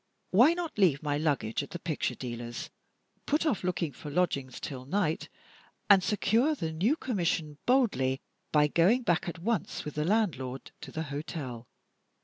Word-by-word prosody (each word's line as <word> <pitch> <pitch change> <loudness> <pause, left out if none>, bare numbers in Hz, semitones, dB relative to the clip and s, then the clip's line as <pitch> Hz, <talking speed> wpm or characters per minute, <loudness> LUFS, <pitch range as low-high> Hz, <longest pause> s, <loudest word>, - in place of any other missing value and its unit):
Why 250 - +6
not 340 -10 -4
leave 165 -7 +4
my 145 -1 0
luggage 140 -8 0
at 140 - -8
the - - -5
picture 165 -3 -2
dealer's, 120 -1 -6 0.6
put 300 +3 +2
off 270 -12 +1
looking 170 -4 -1
for 150 - -9
lodgings 140 -6 0
till 130 -2 -6
night, 165 -1 0 0.6
and 195 -2 +7
secure 225 +9 +2
the 165 - -3
new 200 - +2
commission 170 - -1
boldly 200 - +3 0.3
by 150 -1 +5
going 190 - +3
back 175 -3 +1
at 170 - -6
once 205 +2 -2
with 150 - -5
the 150 - -1
landlord 160 - 0
to - - -8
the 160 - -3
hotel? 135 -6 -5
165 Hz, 160 wpm, -30 LUFS, 145-210 Hz, 0.6 s, and